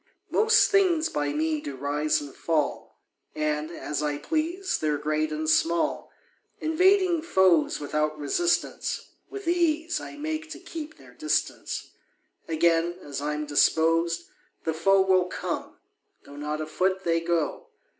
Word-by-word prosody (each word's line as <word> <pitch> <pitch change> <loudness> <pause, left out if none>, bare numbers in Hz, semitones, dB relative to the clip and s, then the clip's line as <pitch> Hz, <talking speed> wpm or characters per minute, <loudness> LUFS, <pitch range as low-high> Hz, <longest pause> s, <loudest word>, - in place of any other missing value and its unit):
Most 450 +2 +4
things 360 -6 +3
by 145 -1 -1
me 155 +1 0
do 140 -2 -6
rise 150 +3 0
and 145 -2 -9
fall, 155 -4 -2 0.4
And, 150 0 -1
as 150 -3 -4
I 150 -1 -1
please, 335 - -1
they're 150 -1 0
great 155 +1 -1
and 155 +1 -3
small; 165 +2 +1 0.5
Invading 360 +1 +3
foes 190 - +3
without 150 +1 -1
resistance, 345 - -1 0.2
With 405 -3 -8
ease 335 -1 +1
I - - -9
make 315 +1 -4
to - - -10
keep 315 -1 -8
their - - -16
distance: 310 -1 -2 0.6
Again, 165 +1 +2
as 140 -1 -5
I'm 150 +1 -2
disposed, 165 +3 +2 0.4
the 160 - -1
foe 195 +5 +4
Will 190 -1 +3
come, 180 - -5 0.5
though 140 - -12
not 150 +1 -3
a - - -2
foot 185 +4 0
they 165 -1 +2
go. 165 -2 -1
165 Hz, 140 wpm, -26 LUFS, -, 0.6 s, Most